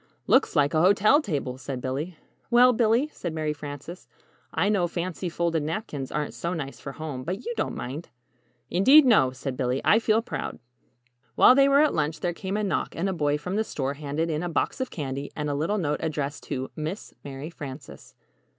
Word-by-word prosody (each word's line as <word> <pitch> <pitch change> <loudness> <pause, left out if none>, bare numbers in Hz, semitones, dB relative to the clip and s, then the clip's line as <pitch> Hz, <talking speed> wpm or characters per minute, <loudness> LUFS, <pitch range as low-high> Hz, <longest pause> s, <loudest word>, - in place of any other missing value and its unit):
"Looks - - +3
like 145 +1 +3
a 155 - +3
hotel 205 - +5
table," 140 - -3
said 130 0 -5
Billy. 145 +7 -4 0.3
"Well, 250 +1 +6
Billy," 235 +6 +2
said 170 -3 -5
Mary 155 -1 -1
Frances, 145 +4 -8 0.4
"I 160 +5 +1
know 200 -4 +2
fancy 175 +1 -3
folded 170 -1 0
napkins 150 - -4
aren't 150 -1 -2
so 170 +2 -3
nice 140 -4 -5
for 140 - -7
home 145 -4 -6
but 190 - -4
you 240 - -2
don't 220 - -2
mind." 135 +7 -6 0.6
"Indeed, 270 - +7
no," 220 - +5
said 130 +1 -5
Billy; 125 0 0
"I 220 - +6
feel 225 0 +2
proud." - - -5 0.8
While - - +8
they 275 +1 +5
were 280 +1 +6
at 305 - +3
lunch 155 +1 -1
there 175 -1 0
came 190 +3 -3
a 215 - -1
knock 195 - -1
and 185 +4 -1
a - - -1
boy 150 -3 +1
from 180 +7 -4
the 220 - +2
store 140 -9 -3
handed 150 +3 -2
in 155 0 -1
a 175 - -2
box 170 - -1
of 260 - -2
candy 140 -2 -5
and 150 -1 -2
a - - -1
little 160 +9 0
note 150 -6 -1
addressed 150 -3 -3
to 130 -2 -4
_Miss 160 +7 -5
Mary 140 +3 -7
Frances. 140 -3 -10
160 Hz, 205 wpm, -26 LUFS, 145-200 Hz, 0.8 s, While